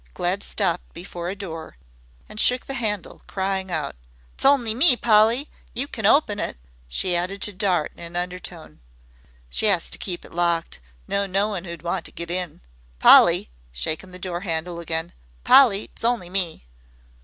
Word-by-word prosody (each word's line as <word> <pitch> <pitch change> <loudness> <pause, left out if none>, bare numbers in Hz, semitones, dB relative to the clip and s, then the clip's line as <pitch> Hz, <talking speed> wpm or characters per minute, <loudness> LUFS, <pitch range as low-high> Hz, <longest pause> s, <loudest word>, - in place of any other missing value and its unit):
Glad 185 +3 -1
stopped 190 -5 -2
before 175 0 -6
a 195 - -4
door 165 - -8 0.5
and 215 - -9
shook 250 +2 +4
the 270 - -4
handle, 215 -6 -3
crying 190 0 -2
out: 155 -5 -3 0.4
"'S - - -2
only 265 -5 +4
me, 255 +3 +6
Polly. 230 +5 +3 0.3
You 265 +4 -1
can 220 -7 -1
open 215 -5 +3
it." - - -3 0.3
She 175 - +1
added 180 +3 -1
to 210 - 0
Dart 185 -5 0
in - - -18
an 170 +1 -8
undertone: 180 - -6 0.7
"She 65 - 0
'as 185 -5 +2
to - - 0
keep 180 -3 -4
it - - -14
locked. 170 -1 0 0.3
No 200 0 0
knowin' 195 -1 -1
who'd 170 -2 -8
want 175 +1 -2
to - - -7
get 170 0 -4
in. 180 -3 -2 0.4
Polly," - - +6 0.2
shaking 155 - -3
the 180 - -8
door 180 -1 -4
handle 170 -1 -3
again, 165 0 -2 0.3
"Polly's 225 -8 +4
only 230 -7 0
me." 180 - +1
185 Hz, 165 wpm, -23 LUFS, 170-210 Hz, 0.7 s, me